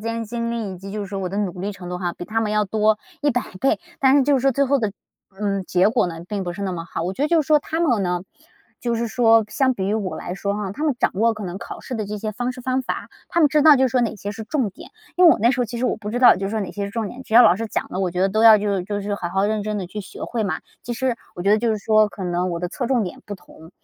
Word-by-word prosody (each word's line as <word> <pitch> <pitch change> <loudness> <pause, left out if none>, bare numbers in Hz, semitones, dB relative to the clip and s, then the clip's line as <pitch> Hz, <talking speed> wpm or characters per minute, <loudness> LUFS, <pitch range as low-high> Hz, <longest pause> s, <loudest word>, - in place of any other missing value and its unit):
间 230 +1 -3
精 235 +1 -3
力 225 -5 -3
以 - - -11
及 195 +2 -9
就 210 -1 -3
是 195 - -6
我 190 -2 -2
的 195 - -5
努 180 -3 -2
力 205 +2 -3
程 180 -2 -10
度 180 0 -4
哈， 175 -2 -2
比 175 - -8
他 220 +3 -1
们 215 -2 -1
要 210 0 +2
多 215 +1 +2 0.2
100 265 -5 +1 0.2
倍， 270 - +2 0.2
但 270 0 +5
是 280 - +5
就 285 +1 +3
是 265 - +2
说 270 +1 +3
最 280 +3 +2
后 280 +1 +2
的， 215 -5 -1 0.5
嗯， 200 -2 0
结 185 +2 +3
果 225 -4 +2
呢 165 - -5
并 200 -3 -3
不 175 - -3
是 200 +3 -6
那 190 -2 -2
么 165 -1 -5
好。 165 - -5
我 180 +3 -2
觉 270 - -4
得 300 - +2
就 335 0 +4
是 275 - -15
说 305 -1 +5
他 320 +3 -4
们 245 -11 +2
呢， 180 -1 -1 0.6
就 235 -1 -1
是 230 0 -1
说 225 -2 +4
相 260 0 +1
比 190 - -3
于 210 - 0
我 200 -4 -2
来 180 - -5
说 200 +1 -2
哈， 205 -2 -3
他 300 +9 -4
们 290 -4 +2
掌 - - +2
握 225 +4 +2
可 210 -2 -7
能 180 +2 -5
考 - - -8
试 255 - -6
的 215 -3 -3
这 210 0 -5
些 215 +1 -3
方 245 +3 -2
式 250 - -10
方 260 +1 0
法， - - -4 0.2
他 340 - +1
们 300 - +6
知 300 +1 +3
道 310 -2 +9
就 265 - +3
是 - - +3
说 250 - +2
哪 235 - 0
些 200 +1 -5
是 220 0 -7
重 255 -6 -1
点。 - - -13 0.3
因 360 - +5
为 330 - +10
我 - - -1
那 235 +3 +5
时 265 -1 -1
候 - - +2
其 235 +1 -6
实 255 - -1
我 - - 0
不 210 -1 -6
知 245 - -2
道 250 - +7
就 195 +1 -3
是 - - -4
说 220 0 -1
哪 195 - -4
些 200 -1 -3
是 200 - -5
重 220 -1 -3
点， 260 +2 -9
只 220 - -6
要 245 - +10
老 180 -5 +6
师 225 - -3
讲 - - -3
的， 185 - -5
我 185 -2 0
觉 180 +1 -3
得 195 - +3
都 215 +3 +1
要 225 -1 +9
就 205 -1 -1
是 180 - -3
就 205 +1 -3
是 205 +1 -2
好 175 -4 -4
好 195 +3 0
认 215 0 0
真 215 0 -3
地 185 - -4
去 210 +4 -6
学 190 - -10
会 235 -2 -2
嘛， 175 -5 -2 0.2
其 240 - -4
实 250 0 -1 0.2
我 175 - -6
觉 200 - +2
得 215 - +5
就 230 0 0
是 215 - 0
说 215 0 +3
可 195 - -9
能 180 +1 -1
我 170 - -3
的 180 - -2
侧 245 +6 -4
重 250 -3 +2
点 180 - -7
不 205 - -6
同， 160 -3 -16
215 Hz, 365 characters per minute, -22 LUFS, 195-245 Hz, 0.6 s, 为